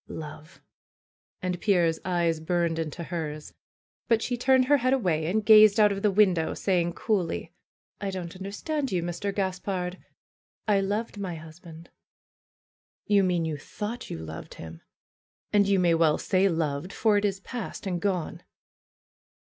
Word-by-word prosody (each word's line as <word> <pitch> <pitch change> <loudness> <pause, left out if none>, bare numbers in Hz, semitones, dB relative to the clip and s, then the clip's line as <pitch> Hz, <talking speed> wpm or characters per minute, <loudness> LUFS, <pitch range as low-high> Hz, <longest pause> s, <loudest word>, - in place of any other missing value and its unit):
^^Love 155 0 -9 0.4
!" - - -63
And 180 -1 -2
Pierre's 175 -6 +2
eyes 170 -3 0
burned 170 0 0
into 165 +1 -4
hers. 155 -3 -5 0.5
But 230 -1 +2
she 245 - -1
turned 260 +1 +3
her 290 +2 +4
head 255 0 +1
away 170 -11 +1
and 210 +4 0
gazed 215 -1 +8
out 210 -1 +6
of 200 0 -3
the 210 - +3
win 200 -1 +4
dow, 160 -2 -2
saying 175 -3 0
coolly: 175 -6 -2 0.5
don't 190 -4 -5
understand 255 - -3
you, 180 -3 0
Mr. 175 +4 -3
Gaspard. 185 -1 -3 0.7
I 205 -2 +4
loved 205 +2 -2
my 185 -4 -4
husband." 165 +1 -12 1.2
238 - - -5
FAITH - - +4
^'You - - +2
mean 175 -2 +1
you 155 -2 -3
thought 210 - -6
you - - -5
loved 80 0 -8
him! 80 0 -10 0.7
And 205 -1 +4
you 200 -1 +3
may 175 -2 +3
well 165 -2 +3
say 195 0 +2
loved, 160 0 -2
for 215 -1 +2
it 205 - 0
is 195 -2 0
past 230 +1 -7
and 180 -3 -2
gone." 185 -5 -2
185 Hz, 165 wpm, -27 LUFS, 165-205 Hz, 1.2 s, gazed